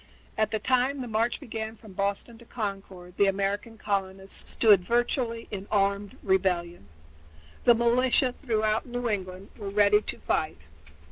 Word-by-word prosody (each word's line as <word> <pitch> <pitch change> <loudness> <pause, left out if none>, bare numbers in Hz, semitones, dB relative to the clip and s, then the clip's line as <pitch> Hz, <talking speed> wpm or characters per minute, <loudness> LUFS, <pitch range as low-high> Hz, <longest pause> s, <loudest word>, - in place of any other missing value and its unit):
At 215 -1 +1
the 220 - 0
time 255 +4 +1
the 250 - -5
march 230 +2 0
began 220 -1 -5
from 215 -3 -14
Boston 200 +4 -2
to 235 - -15
Concord 195 -5 -6
the 200 - +5
American 200 +3 -1
colonists 195 -2 -3
stood 205 -5 +5
virtually 235 +2 0
in 200 -1 -5
armed 200 -1 0
rebellion. 180 -3 0 0.8
The 240 - +7
militia 245 +2 +3
throughout 220 -1 0
New 245 0 -3
England 190 -2 -4
were 205 -2 -6
ready 205 +1 +4
to - - -4
fight. 155 - -1
210 Hz, 145 wpm, -27 LUFS, 195-235 Hz, 0.8 s, The